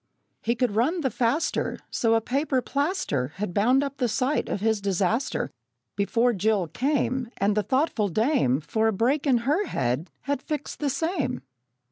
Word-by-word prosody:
He 235 Hz, +2 st, 0 dB
could 245 Hz, -1 st, +1 dB
run 310 Hz, +11 st, +2 dB
the 265 Hz, -4 st, 0 dB
faster, 255 Hz, +9 st, 0 dB
So 225 Hz, -1 st, +2 dB
a 225 Hz, -, +2 dB
paper 270 Hz, +3 st, 0 dB
plaster 280 Hz, -, -1 dB
Had 195 Hz, -2 st, -3 dB
bound 250 Hz, +8 st, +3 dB
up 280 Hz, 0 st, -4 dB
the 250 Hz, -3 st, +1 dB
sight 255 Hz, +6 st, 0 dB
of -, -, -1 dB
his 220 Hz, 0 st, +1 dB
disaster 200 Hz, -, 0 dB, 0.4 s
Before 230 Hz, +4 st, +2 dB
Jill 205 Hz, -1 st, +1 dB
came; 260 Hz, -, 0 dB
And 200 Hz, +1 st, +1 dB
the 210 Hz, -, +3 dB
thoughtful 260 Hz, -3 st, +1 dB
dame, 210 Hz, -, +2 dB
For 220 Hz, +8 st, 0 dB
a -, -, +3 dB
break 265 Hz, +9 st, +1 dB
in 240 Hz, -3 st, +2 dB
her 315 Hz, +9 st, +1 dB
head, 130 Hz, +8 st, -1 dB
had 280 Hz, -1 st, -2 dB
fixed 300 Hz, 0 st, -5 dB
the 290 Hz, -, 0 dB
same. 320 Hz, -, -1 dB
240 Hz, 170 wpm, -26 LUFS, 205-280 Hz, 0.4 s, bound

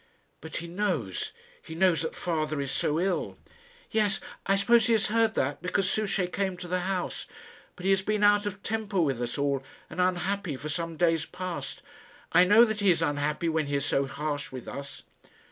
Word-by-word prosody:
"But 160 Hz, -, -8 dB
he 170 Hz, -, -3 dB
knows 170 Hz, -, -2 dB, 0.3 s
he 160 Hz, -, -9 dB
knows 170 Hz, -3 st, +3 dB
that 160 Hz, -, -3 dB
father 155 Hz, -3 st, -1 dB
is 140 Hz, -1 st, -2 dB
so 155 Hz, +2 st, 0 dB
ill." 185 Hz, 0 st, -1 dB, 0.5 s
"Yes; 210 Hz, -2 st, +2 dB, 0.3 s
I 195 Hz, -, +4 dB
suppose 230 Hz, +3 st, +4 dB
he 230 Hz, -, +4 dB
has 215 Hz, -2 st, +2 dB
heard 225 Hz, 0 st, +2 dB
that, 140 Hz, +3 st, 0 dB
because 180 Hz, +2 st, 0 dB
Souchey 200 Hz, -2 st, +1 dB
came 190 Hz, +1 st, -2 dB
to 180 Hz, -, -7 dB
the 180 Hz, +1 st, 0 dB
house. 185 Hz, 0 st, -3 dB, 0.5 s
But 180 Hz, -, -11 dB
he 195 Hz, -, +4 dB
has 195 Hz, 0 st, +3 dB
been 210 Hz, +1 st, 0 dB
out 205 Hz, 0 st, +5 dB
of 200 Hz, 0 st, -6 dB
temper 215 Hz, -3 st, -1 dB
with 135 Hz, -7 st, +1 dB
us 120 Hz, +2 st, -2 dB
all, 140 Hz, -1 st, +1 dB, 0.3 s
and 180 Hz, -, -1 dB
unhappy, 185 Hz, -3 st, 0 dB
for 155 Hz, -, -6 dB
some 165 Hz, +1 st, -3 dB
days 165 Hz, -2 st, +2 dB
past. 165 Hz, -7 st, -5 dB, 0.5 s
I 180 Hz, -, +6 dB
know 210 Hz, +5 st, +7 dB
that 220 Hz, -2 st, -2 dB
he 200 Hz, -1 st, +3 dB
is 165 Hz, -2 st, +3 dB
unhappy 145 Hz, +2 st, 0 dB
when 160 Hz, -2 st, 0 dB
he 145 Hz, -, -1 dB
is 140 Hz, 0 st, 0 dB
so 135 Hz, 0 st, +1 dB
harsh 145 Hz, +1 st, -3 dB
with 130 Hz, -2 st, -8 dB
us." 140 Hz, 0 st, -7 dB
175 Hz, 200 wpm, -28 LUFS, 150-200 Hz, 0.5 s, know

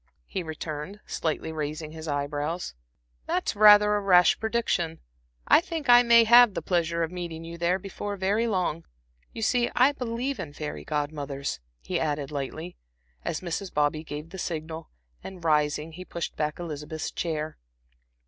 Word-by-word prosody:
he 190 Hz, -, -4 dB
returned, 160 Hz, +3 st, -6 dB
slightly 160 Hz, 0 st, -2 dB
raising 155 Hz, 0 st, -4 dB
his 160 Hz, 0 st, -8 dB
eye 145 Hz, -1 st, 0 dB
brows. 150 Hz, -, -3 dB, 0.5 s
"That's 185 Hz, -, -1 dB
rather 210 Hz, 0 st, +7 dB
a 205 Hz, -, 0 dB
rash 180 Hz, -3 st, +5 dB
prediction. 220 Hz, -8 st, -1 dB, 0.5 s
I -, -, +7 dB
think 330 Hz, -6 st, -5 dB
I 245 Hz, 0 st, +9 dB
may 235 Hz, -1 st, +7 dB
have 235 Hz, -2 st, +7 dB
the -, -, -2 dB
pleasure 170 Hz, -2 st, 0 dB
of 165 Hz, -, -3 dB
meeting 170 Hz, -2 st, -6 dB
you 165 Hz, +1 st, -7 dB
there 175 Hz, +2 st, +2 dB
before 200 Hz, +1 st, -5 dB
very 205 Hz, +5 st, +1 dB
long. 180 Hz, -, -1 dB, 0.5 s
You 225 Hz, -, -5 dB
see 240 Hz, +1 st, +2 dB
I 260 Hz, +3 st, +5 dB
believe 250 Hz, +1 st, -3 dB
in 145 Hz, -3 st, -6 dB
fairy 150 Hz, 0 st, -6 dB
Godmothers," 145 Hz, -, -3 dB, 0.2 s
he -, -, -1 dB
added, 145 Hz, -2 st, -2 dB
lightly, 155 Hz, +5 st, -5 dB, 0.5 s
as -, -, -3 dB
Mrs. 185 Hz, +2 st, -4 dB
Bobby 150 Hz, +1 st, +1 dB
gave 150 Hz, +1 st, -7 dB
the 190 Hz, -, -7 dB
signal, 160 Hz, -1 st, -5 dB, 0.3 s
and, 185 Hz, -3 st, -9 dB
rising, 150 Hz, 0 st, +1 dB
he 180 Hz, +3 st, -8 dB
pushed 170 Hz, -2 st, -5 dB
back 150 Hz, 0 st, -2 dB
Elizabeth's 155 Hz, -2 st, -5 dB
chair. 155 Hz, -2 st, -3 dB
165 Hz, 160 wpm, -27 LUFS, 150-205 Hz, 0.5 s, I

